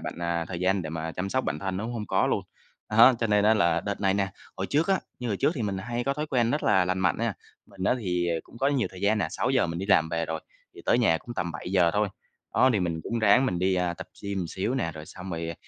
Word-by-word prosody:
bạn, - - -5
à, 85 -1 0
thời 90 -2 -5
gian 95 0 +2
để 80 - -5
mà 80 0 -4
chăm 90 +3 -3
sóc 130 +5 0
bản - - -2
thân 95 -1 -3
nó 100 - -3
cũng 120 - -4
hông 110 -3 -4
có - - +2
luôn. - - 0 0.5
Đó, 115 +4 +8
cho 115 - +1
nên 105 -1 +3
á 110 +1 +5
là 85 -6 +2
đợt 100 -1 -4
này 95 -1 +2
nè 100 -1 +1 0.3
hồi - - -2
trước 155 +6 +2
á 190 -1 +3 0.2
như 125 - -4
hồi 105 - 0
trước 95 - +2
thì 125 - -3
mình 100 -2 -2
hay 120 +5 -3
có 140 - 0
thói 150 +2 -3
quen 120 -5 +1
rất 150 - 0
là 95 -1 +4
lành 95 +1 -1
mạnh 90 -3 +2
nha, - - 0 0.3
mình 95 -2 -7
á - - +3
thì, 90 -5 -1
ờ, 85 - +1
cũng - - -15
có 135 - +1
nhiều 140 -4 +1
thời 90 - -11
gian 105 +2 +2
nè, 90 - +1
6:00 - - +1
mình 85 0 -4
đi 95 - -4
làm 80 -5 +4
về 85 0 -1
rồi, 80 0 -3 0.3
thì - - -11
tới - - +3
nhà 80 0 +3
cũng 120 - -9
tầm 85 -6 -2
7:00 85 +2 +1
thôi. 105 +1 +1 0.5
Đó, 130 - +5
thì 105 - +1
mình 85 -2 -1
cũng 115 - -2
ráng 110 +4 +5
mình 90 - -1
đi, 95 +1 +2
a, 90 -1 0
tập - - -8 0.2
gym 100 -1 -3
một 90 - -1
xíu 95 +9 -2
nè, 120 -11 -1
rồi 75 0 -9
xong 95 +3 -9
rồi, 85 -1 -3
ờ, 85 - -4
95 Hz, 305 wpm, -27 LUFS, 85-115 Hz, 0.5 s, Đó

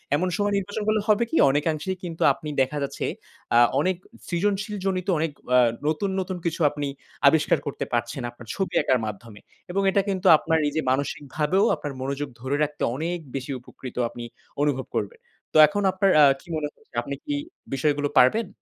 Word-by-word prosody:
এমন 180 +5 0
সময় 205 0 0
নির্বাচন 205 +2 -3
করলে 215 0 +2
হবে 215 +2 +4
কি? 325 - 0
অনেকাংশেই 155 +6 -1
কিন্তু 165 -2 -6
আপনি 150 +2 -8
দেখা 140 +3 0
যাচ্ছে 140 - -3 0.5
আ - - +7 0.2
অনেক 185 +5 +1 0.3
সৃজনশীল 200 +4 -1
জনিত 185 -1 -1
অনেক 160 0 0 0.2
আ - - +7 0.3
নতুন, 160 +6 0
নতুন 185 -1 -3
কিছু 170 0 -2
আপনি 145 0 -4 0.4
আবিষ্কার 150 +1 +4
করতে 140 - -3
পারছেন 120 +2 -1
আপনার 120 -1 -14
ছবি 195 -1 -2
আঁকার 130 -2 +2
মাধ্যমে। 105 0 -8 0.3
এবং 195 - 0
এটা 200 - +3
কিন্তু 190 0 0
আপনার 160 0 +1
নিজে 150 +2 -1
মানসিকভাবেও 145 - 0
আপনার 145 -2 -6
মনোযোগ 140 +2 -3
ধরে 130 +3 -1
রাখতে 150 0 -3
অনেক 170 +4 -2 0.2
বেশি 135 +1 -4
উপকৃত 125 0 -11
আপনি 120 - -8 0.4
অনুভব 140 -3 0
করবেন। 475 - -3 0.3
তো - - +3
এখন 205 +7 -2
আপনার 190 +1 +2
আ - - +9 0.2
কি - - -22
মনে 155 -1 -1
হচ্ছে - - -30
আপনি 140 +3 -5
কি 290 - -2 0.4
বিষয়গুলো 145 +1 +1
পারবেন? 200 - +5
155 Hz, 175 wpm, -25 LUFS, 140-190 Hz, 0.5 s, আ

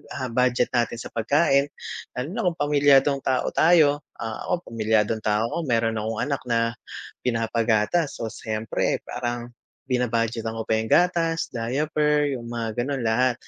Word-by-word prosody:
ah, 130 -2 -3
budget 125 0 +2
natin 120 -1 0
sa - - -6
pagkain 140 +4 +2 0.4
lalo 125 +2 -4
na 235 - -1
kung 170 -2 -1
pamilyadong 145 -1 +4
tao 130 -1 0
tayo, 155 -3 +4 0.2
ah, 110 -1 -5
ako 180 -1 -2
pamilyadong 110 -1 +1
tao 105 +1 +1
ko - - -4
meron 115 -5 +1
akong 110 0 -3
anak 140 +1 -1
na 120 -2 +1 0.7
pinapagatas 115 +5 +1
o 115 - -3
siyempre 110 0 -2
parang 120 -1 -4 0.4
bina-budgetan 115 -2 0
ko 115 - -3
pa 110 0 0
yung 110 0 -3
gatas, 170 -2 +2
diaper, 150 +5 0
yung 120 - -9
mga 115 -1 -3
ganon 135 +1 -1
lahat. 120 +3 +2
120 Hz, 150 wpm, -24 LUFS, 115-145 Hz, 0.7 s, pamilyadong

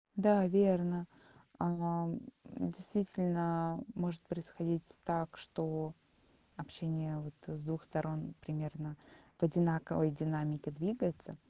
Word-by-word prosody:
Да, 205 -1 +7
верно. 175 -2 +5 0.5
Э, - - +1
м, 170 0 +1 0.4
действительно 170 -3 0
может 175 -3 -2
происходить 170 -1 -3
так, 165 -1 -1
что 155 0 -3 0.6
общение 160 -2 -3
вот, 150 -1 -7
с 155 -1 -5
2 160 +1 -3
сторон 155 0 -2
примерно 155 0 -4 0.4
в 175 - -2
одинаковой 160 -1 +4
динамике 150 0 -1
двигается. 175 0 -1
165 Hz, 100 wpm, -36 LUFS, 155-175 Hz, 0.6 s, Да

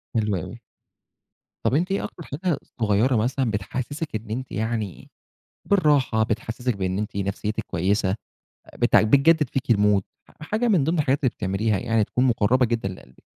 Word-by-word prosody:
حلو 105 -2 +1
أوي. 80 - -7 1.1
طَب - - +2
أنتِ 175 +5 +1
إيه 195 - 0
أكتر 170 - -7
حاجة 160 +2 -2 0.2
صغيرة 110 +5 +3
مثلًا 125 +2 0
بتحسسِك 130 - -4
إن 110 0 -5
أنتِ 125 +4 -4
يعني 110 -3 -3 0.6
بالراحة، 145 - +3
بتحسسِك 115 +2 -2
بإن 95 -1 -2
أنتِ 105 -1 -4
نفسيتِك 100 +2 -2
كويسة، 95 +3 +1 0.6
بت - - +3
بتجدد 140 +5 +4
فيكِ 135 -2 +1
الmood، 105 -2 +3 0.3
ح - - -18
حاجة 230 +3 0
من 175 -10 +3
ضمن 165 +2 0
الحاجات 140 -1 +2
اللي 130 - +3
بتعمليها، 100 +1 0
يعني 115 -1 +1
تكون 125 +5 0
مقربة 125 +1 +3
جدًا 115 -3 -1
لقلبِك. 65 -9 -12
115 Hz, 155 wpm, -24 LUFS, 105-140 Hz, 1.1 s, بتجدد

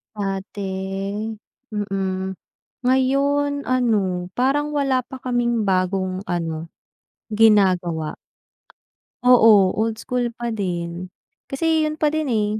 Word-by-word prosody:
Dati, 195 +1 -3 0.4
mm. 190 -2 -2 0.5
Ngayon 280 +3 +2
ano, 205 -8 +1
parang 290 +4 +1
wala 265 -3 +1
pa 260 -1 -9
kaming 240 -2 0
bagong 185 +1 0
ano, 165 -2 -3 0.7
ginagawa. 185 -7 +3 1.1
Oo, 240 -3 +7 0.3
old 225 0 -1
school 245 -1 -2
pa 240 0 -5
din. 180 -4 -4 0.4
Kasi 320 +3 +1
'yon 305 0 -3
pa 305 - +4
din, 310 0 -1
eh. 210 -2 +2
215 Hz, 100 wpm, -22 LUFS, 190-255 Hz, 1.1 s, Oo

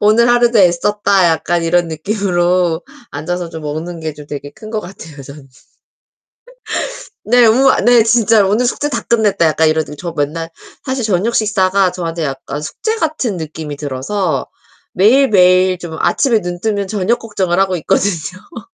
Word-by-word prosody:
오늘 220 +3 +4
하루도 240 -1 +3
애썼다.' 195 +2 +2
약간 165 +1 0
이런 175 +1 +1
느낌으로 175 -1 0 0.3
앉아서 175 +4 -4
좀 160 -2 -9
먹는 160 +3 -5
게 155 -1 -4
좀 145 -1 -12
되게 145 -1 -7
큰 215 +3 -12
것 220 - -2
같아요, 160 -7 -11
저는. 140 0 -12 1.8
네. 245 +2 +4
우와 260 +5 +4
네. 240 -1 +5
진짜 225 -2 +3
'오늘 210 +6 +1
숙제 290 +4 -1
다 235 -6 -3
끝냈다.' 215 -7 +1
약간 160 0 +2
이러 155 0 +1
저 155 +3 -7
맨날 155 +3 -2 0.4
사실 260 -3 -3
저녁 210 +3 0
식사가 195 -3 +2
저한테 170 -2 -4
약간 140 +1 -5
숙제 440 - -3
같은 305 - -2
느낌이 155 -2 -6
들어서 150 +7 -3 0.5
매일매일 185 -5 +4
좀 170 -2 -7
아침에 240 -6 +2
눈뜨면 195 +3 -3
저녁 215 +3 0
걱정을 190 -5 -2
하고 190 -2 +1
있거든요. 185 - -3
185 Hz, 315 characters per minute, -15 LUFS, 160-215 Hz, 1.8 s, 네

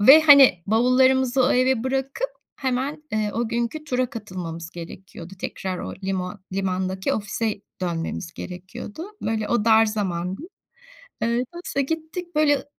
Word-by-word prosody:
ve 270 +9 +9
hani 275 - +8
bavullarımızı 255 +3 +4
o - - +3
eve 255 -1 +2
bırakıp 270 - -1 0.3
hemen, 265 +3 -2
eee, 215 -1 0
o 235 0 0
günkü 235 +7 -2
tura 255 -3 0
katılmamız 180 -8 -6
gerekiyordu. 175 +1 -10
Tekrar 185 -1 -4
o - - -5
limo 185 -1 -2 0.2
limandaki 190 0 -1
ofise 215 0 -2 0.2
dönmemiz 170 0 -3
gerekiyordu. 190 - -7 0.2
Böyle 220 -1 -1
o 235 -3 +1
dar 225 0 +6
zamandı. 190 - -2 0.8
Iıı, 230 - +2 0.2
neyse 345 -5 -2
gittik, 325 +4 -4
böyle, 300 -1 +4
ı - - -10
225 Hz, 135 wpm, -24 LUFS, 190-265 Hz, 0.8 s, ve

